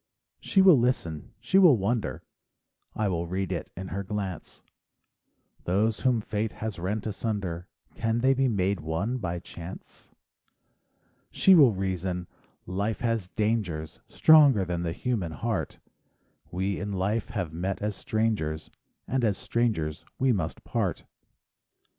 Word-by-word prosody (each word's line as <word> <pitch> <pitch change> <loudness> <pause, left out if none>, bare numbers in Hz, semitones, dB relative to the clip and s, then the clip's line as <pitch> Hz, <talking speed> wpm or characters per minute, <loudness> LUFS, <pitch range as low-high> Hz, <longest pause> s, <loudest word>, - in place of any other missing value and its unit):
She 195 - +3
will 180 -8 +8
listen, 85 - -1
she 190 - +3
will 170 -10 +7
wonder, 100 - -1 0.7
—I 110 - 0
will 85 -3 -1
read 95 +2 -2
it - - -3
in 95 0 -5
her 100 +1 -3
glynce— 95 -2 -5 1.0
Those 105 +5 +1
whom 125 -4 +2
fate 105 +1 -2
has 110 -4 -5
rent 100 +4 -2
asunder 100 -5 -3 0.3
Can 115 0 -1
they 135 +2 +4
be 135 0 +2
made 100 -4 0
one 85 +11 -2
by 90 -5 -3
chance? 85 +1 -10 1.2
She 195 - +5
will 140 -10 +7
reason: 95 -1 -2 0.4
"Life 100 +4 -2
has 115 -5 0
dangers, 105 -8 -1
Stronger 145 -10 +6
than 85 -1 -2
the 85 -1 -2
human 105 -10 -2
heart; 110 +6 -3 0.7
We 95 +2 -2
in 100 +2 -4
life 100 +4 -1
have 90 -8 -3
met 90 +3 -2
as 105 -1 -2
strangers, 105 -10 -1 0.4
And 130 -1 0
as 105 -5 +2
strangers 95 -11 -1
we 130 -1 +3
must 85 -6 -3
part." - - -2
100 Hz, 135 wpm, -27 LUFS, 90-115 Hz, 1.2 s, will